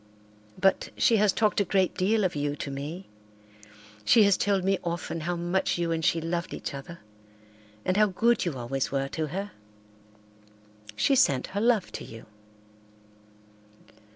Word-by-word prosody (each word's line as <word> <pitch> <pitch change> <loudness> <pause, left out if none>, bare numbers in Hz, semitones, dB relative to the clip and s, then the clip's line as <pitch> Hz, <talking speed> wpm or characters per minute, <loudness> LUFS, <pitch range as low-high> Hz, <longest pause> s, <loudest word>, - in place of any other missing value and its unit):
But 195 - +2
she 230 - +4
has 210 -1 +4
talked 210 0 +1
a - - +3
great 190 -1 +1
deal 210 +3 +1
of 185 - 0
you 145 0 -1
to 140 - -5
me. 150 +7 -6 1.0
She 215 - +6
has 200 -2 +4
told 195 -1 +1
me 195 +1 +1
often 170 -1 -3
how 175 +3 -2
much 175 +2 0
you 170 -1 -1
and 165 0 -1
she 165 - +2
loved 170 +2 -3
each - - -6
other 170 +5 -9 0.8
and 185 - +1
how 215 0 +5
good 230 +5 +2
you 165 -7 -3
always 130 +2 -2
were 135 0 -1
to 155 +1 -3
her. 195 +6 -5 1.4
She 190 - +2
sent 135 - +3
her 200 - -1
love 230 -4 +2
to - - -6
you." 115 0 -11
175 Hz, 160 wpm, -27 LUFS, 150-200 Hz, 1.4 s, She